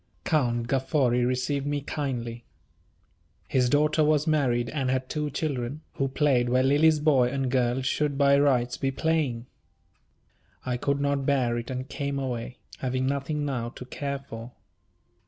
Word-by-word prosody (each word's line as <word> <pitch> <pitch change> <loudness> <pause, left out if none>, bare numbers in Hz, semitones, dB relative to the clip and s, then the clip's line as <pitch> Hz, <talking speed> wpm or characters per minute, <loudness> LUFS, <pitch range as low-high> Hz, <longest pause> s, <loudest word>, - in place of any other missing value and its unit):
Count 120 -7 +1
Gaffori 130 -1 +1
received 135 +3 -1
me 145 0 0
kindly. 120 -5 -4 1.0
His 125 -2 +2
daughter 150 +3 +3
was 150 0 +3
married 130 -7 +1
and 135 -4 -1
had 130 0 0
two 150 -1 -2
children, 140 -1 -3
who 135 - -1
played 130 -3 +2
where 130 +1 +3
Lily's 150 +3 +4
boy 140 -5 +3
and 135 -1 -2
girl 125 0 +1
should 145 +1 0
by 140 0 +5
rights 125 -4 +2
be 135 - 0
playing. 135 -5 0 1.2
I 125 -1 -1
could 140 +3 0
not 140 -1 0
bear 130 -4 +2
it, 120 - -8
and 130 0 -4
came 140 0 -3
away, 125 -2 -4 0.2
having 130 0 -1
nothing 140 +2 -1
now 125 -4 -2
to 125 - -10
care 140 +2 -4
for. 120 -3 -10
135 Hz, 155 wpm, -27 LUFS, 125-145 Hz, 1.2 s, by